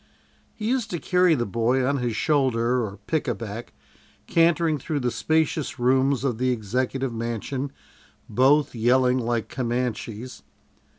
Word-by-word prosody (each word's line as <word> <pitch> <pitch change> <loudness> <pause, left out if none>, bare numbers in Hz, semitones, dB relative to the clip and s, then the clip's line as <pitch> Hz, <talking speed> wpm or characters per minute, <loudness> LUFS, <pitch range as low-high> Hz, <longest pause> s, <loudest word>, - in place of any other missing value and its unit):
He 215 -2 -4
used 250 -1 0
to 175 - -3
carry 180 -1 +3
the 120 -4 -1
boy 120 +5 +1
on 140 +2 +1
his 120 -3 -2
shoulder 125 -4 +1
or 100 -2 -6
"pick 155 -2 -1
a 120 - 0
back," 115 +1 -7 0.5
cantering 165 -2 +2
through 145 +3 -2
the 125 -1 0
spacious 155 -1 0
rooms 130 +2 +2
of 125 -5 -1
the 130 0 +1
Executive 125 +3 -1
Mansion, 120 +4 -3 0.6
both 135 +6 +3
yelling 125 +2 +3
like 120 -2 -1
Comanches. 120 -1 -3
130 Hz, 140 wpm, -24 LUFS, 120-145 Hz, 0.6 s, carry